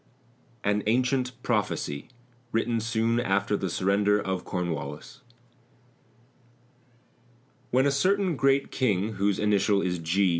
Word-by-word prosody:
AN 105 +1 +1
ANCIENT 125 +2 +1
PROPHECY 100 -10 -2 0.4
(Written 115 +1 0
soon 115 +1 0
after 100 -3 +1
the 95 -2 -2
surrender 100 +4 +2
of 95 -3 -3
Cornwallis) 80 - -5 2.5
When 130 +2 +3
a 140 - +3
certain 185 +5 +1
great 135 0 +2
King, 110 -4 0
whose 100 0 +1
initial 100 -1 +2
is 90 -1 -1
G. 90 +4 +2
105 Hz, 110 wpm, -27 LUFS, 95-125 Hz, 2.5 s, When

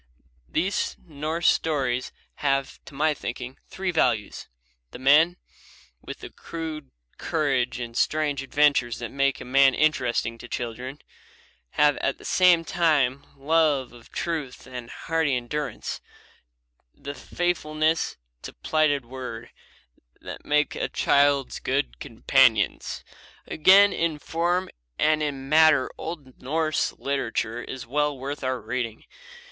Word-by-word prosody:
These 185 +5 -1
Norse 160 +2 -2
stories 130 -6 +1 0.3
have, 135 -1 -1
to - - -12
my 155 +2 +2
thinking, 125 -1 -6
three 190 -1 -3
values. 120 -10 0 0.4
The - - -10
men, 150 +7 +5 0.6
with - - -9
the - - -9
crude 160 -3 -7 0.3
courage 135 -6 0
and 120 -1 -5
the - - -1
strange 150 -3 +1
adventures 135 -3 +2
that 120 - -6
make 140 -1 +1
a - - -8
man 135 +1 +5
interesting 125 -6 +1
to 120 - -9
children, 125 +3 -5 0.8
have 145 -1 +4
at 135 - -1
the - - -14
same 180 -3 +4
time 145 -6 +1
the 135 - -22
love 150 -4 +2
of 120 -1 -16
truth, 155 -7 -4
the 125 -2 -8 0.2
hardy 160 -4 +1
endurance, 130 +1 -4 0.9
the 140 - -7
faithfulness 160 -1 -1 0.2
to - - -8
plighted 145 - +1
word, 120 -2 -7 0.7
that - - -9
make 150 0 +1
them - - -5
a - - -1
child's 140 -1 +2
fit 140 +2 -1
companions. 115 -2 +2 0.4
Again, 195 +5 +6
in 165 -2 0
form 175 +4 -1 0.3
and 155 0 +3
in 140 -3 -3
matter 155 -2 +5
old 150 -6 -8
Norse 155 +4 0
literature 120 -4 -2
is 130 -1 -7
well 145 +3 0
worth 140 +2 -5
our 130 -1 -1
reading. 115 -1 -4
140 Hz, 130 wpm, -25 LUFS, 130-155 Hz, 0.9 s, Again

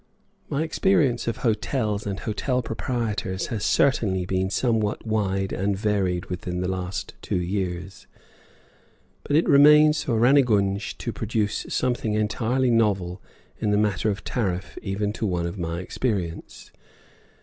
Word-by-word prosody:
My 145 +3 0
experience 160 -8 +1
of 115 - -1
hotels 105 -2 0
and 100 -1 -4
hotel 125 +3 -1
proprietors 105 -4 -2
has 105 - -3
certainly 100 -9 +2
been 95 +1 -1
somewhat 110 0 0
wide 100 -3 -1
and 100 +1 0
varied 95 -4 0
within 90 0 -4
the 90 - -1
last 95 0 -4
two - - -2
years; 90 0 -4 1.2
but 145 - -1
it 160 - +3
remains 150 +2 +6
for 115 - -1
Rannegunj 110 -6 +3
to - - -4
produce 105 -1 -2
something 120 -4 0
entirely 115 +4 +1
novel 100 -6 +1 0.4
in 110 - 0
the 105 - +3
matter 105 0 +1
of 100 0 -3
tariff 95 -6 -2
even 100 +1 -2
to 110 - -2
one 90 -2 -1
of 85 +3 -5
my 85 0 -3
experience. 95 -5 -4
105 Hz, 140 wpm, -24 LUFS, 95-120 Hz, 1.2 s, remains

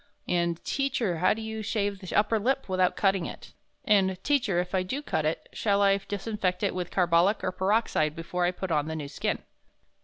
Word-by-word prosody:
and, 170 -1 0
'Teacher, 255 -10 0
how 185 - +4
do 225 - -2
you 220 0 -4
shave 205 -2 -1
the 185 -2 -6
upper 215 +2 +3
lip 265 +5 0
without 185 -1 +2
cutting 195 -3 +1
it?' - - -10 0.3
and, 195 -5 +3
'Teacher, 245 -11 +2
if 180 +1 -3
I 190 - +2
do 260 +11 -4
cut 155 - -1
it, 155 - -2
shall 200 -2 +2
I 195 0 +5
disinfect 200 -1 -3
it 200 - +1
with 180 -1 -3
carbolic 180 +2 +3
or 185 - 0
peroxide 190 -6 +1
before 175 +2 -3
I 175 - +3
put 185 0 -4
on 150 -1 +1
the 160 - -3
new 150 -3 -4
skin?' - - -2
190 Hz, 205 wpm, -28 LUFS, 175-210 Hz, 0.3 s, I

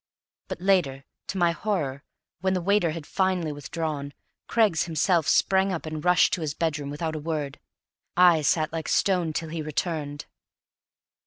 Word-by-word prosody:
But - - -5
later, 175 -8 +1 0.2
to 195 - -4
my 175 -2 +3
horror, 160 -8 -2 0.4
when 190 +1 0
the 180 - -1
waiter 200 -2 +3
had 155 -1 -5
finally 185 -4 0
withdrawn, 145 -1 -4 0.3
Craggs 215 -8 +2
himself 165 0 +1
sprang 190 0 +3
up 170 -3 -4
and 155 -1 -5
rushed 180 0 +4
to 185 - -1
his 150 -2 -3
bedroom 150 -4 -2
without 155 +2 -3
a - - -3
word. 150 -3 -4 0.6
I 175 -3 +6
sat 155 +2 +1
like 160 -1 -3
stone 180 -5 +2
till 160 +1 -4
he 160 0 -4
returned. 150 -1 -3
165 Hz, 160 wpm, -26 LUFS, 150-180 Hz, 0.6 s, I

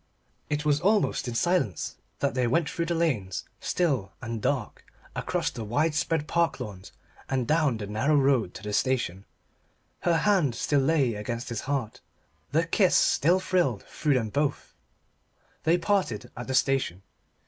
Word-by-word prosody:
It 150 0 -1
was 150 -1 +2
almost 205 -6 +2
in 120 - -4
silence 170 - 0 0.2
that - - +1
they 125 -1 +1
went 150 +6 +2
through 170 -1 -2
lanes 155 - 0 0.2
still 135 - 0
and 115 -2 -5
dark, - - -2 0.3
across - - -1
the 115 - -6
widespread 150 +6 0
park 170 -3 +1
lawns 105 -6 -8 0.4
and 130 -3 0
down 150 -6 +2
the 105 - -5
narrow 110 +9 +1
road 135 -8 +2
to - - -9
the 105 0 -4
station. 120 -7 0 0.7
Her 170 -1 +2
hand 175 - +2
still 145 +4 +1
lay 135 -3 +2
against 115 +5 -4
his 120 -2 -3
heart. 130 -6 -2 0.5
The - - +2
kiss - - +3
still 175 +7 +4
thrilled 175 - 0
through 150 -3 0
them 115 -4 0
both. 145 0 -1 0.9
They 165 +2 +4
parted 180 - -1
at 120 - -7
the 130 - -1
station. 130 -9 +1
135 Hz, 155 wpm, -27 LUFS, 115-165 Hz, 0.9 s, still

